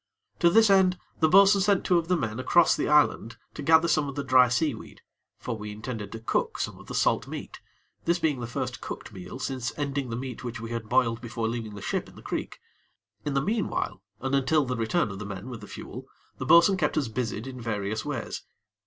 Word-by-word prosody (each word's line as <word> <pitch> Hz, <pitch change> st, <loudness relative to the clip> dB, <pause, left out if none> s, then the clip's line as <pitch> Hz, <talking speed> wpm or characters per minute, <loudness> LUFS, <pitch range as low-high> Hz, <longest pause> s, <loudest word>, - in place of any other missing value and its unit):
To 170 Hz, -, +5 dB
this 220 Hz, +2 st, +5 dB
end, 185 Hz, -2 st, +4 dB, 0.2 s
the 160 Hz, -, +4 dB
bo'sun 195 Hz, +2 st, +6 dB
sent 200 Hz, -1 st, +2 dB
two 180 Hz, -2 st, +4 dB
of 165 Hz, -, -5 dB
the 180 Hz, 0 st, +2 dB
men 115 Hz, -5 st, -3 dB
across 170 Hz, +6 st, +4 dB
the -, -, -1 dB
island 145 Hz, -6 st, +3 dB, 0.2 s
to -, -, -7 dB
gather 160 Hz, +1 st, +5 dB
some 150 Hz, -3 st, +2 dB
of 140 Hz, -, -7 dB
the 140 Hz, -, -2 dB
dry 130 Hz, -1 st, +6 dB
seaweed; 135 Hz, -2 st, -2 dB, 0.4 s
for 120 Hz, -, -4 dB
we 105 Hz, -1 st, -7 dB
intended 105 Hz, -1 st, -6 dB
to 115 Hz, -, -6 dB
cook 115 Hz, -, -1 dB
some -, -, -4 dB
of -, -, -14 dB
the -, -, -6 dB
salt -, -, +2 dB
meat, -, -, -7 dB, 0.5 s
this 170 Hz, +1 st, +2 dB
being 155 Hz, -6 st, 0 dB
the 120 Hz, -, -4 dB
first 120 Hz, -, -4 dB
cooked -, -, -7 dB
meal 90 Hz, +6 st, -8 dB
since 130 Hz, -1 st, -3 dB
ending 140 Hz, -2 st, -2 dB
the 115 Hz, -, -3 dB
meat 125 Hz, 0 st, -6 dB
which 120 Hz, -2 st, -5 dB
we 115 Hz, 0 st, -7 dB
had 115 Hz, -2 st, -4 dB
boiled 120 Hz, -2 st, +2 dB
before 115 Hz, -1 st, -3 dB
leaving 115 Hz, -2 st, -4 dB
the 100 Hz, -, -8 dB
ship -, -, -2 dB
in -, -, -18 dB
the -, -, -13 dB
creek. -, -, -4 dB, 0.7 s
In 145 Hz, -, -1 dB
the 135 Hz, -, +3 dB
meanwhile, 210 Hz, -, -1 dB, 0.2 s
and 135 Hz, +3 st, -3 dB
until 140 Hz, +2 st, +3 dB
the 125 Hz, 0 st, -2 dB
return 115 Hz, -, 0 dB
of 95 Hz, -, -7 dB
the -, -, -5 dB
men 100 Hz, +4 st, -7 dB
with 120 Hz, -3 st, -7 dB
the 105 Hz, -, -10 dB
fuel, -, -, -9 dB, 0.3 s
the -, -, -4 dB
bo'sun 170 Hz, +3 st, +6 dB
kept 155 Hz, -3 st, 0 dB
us 145 Hz, -5 st, +1 dB
busied 110 Hz, -1 st, -3 dB
in 130 Hz, -2 st, -7 dB
various 110 Hz, -1 st, -2 dB
ways. 145 Hz, -6 st, -4 dB
130 Hz, 230 wpm, -27 LUFS, 115-160 Hz, 0.7 s, bo'sun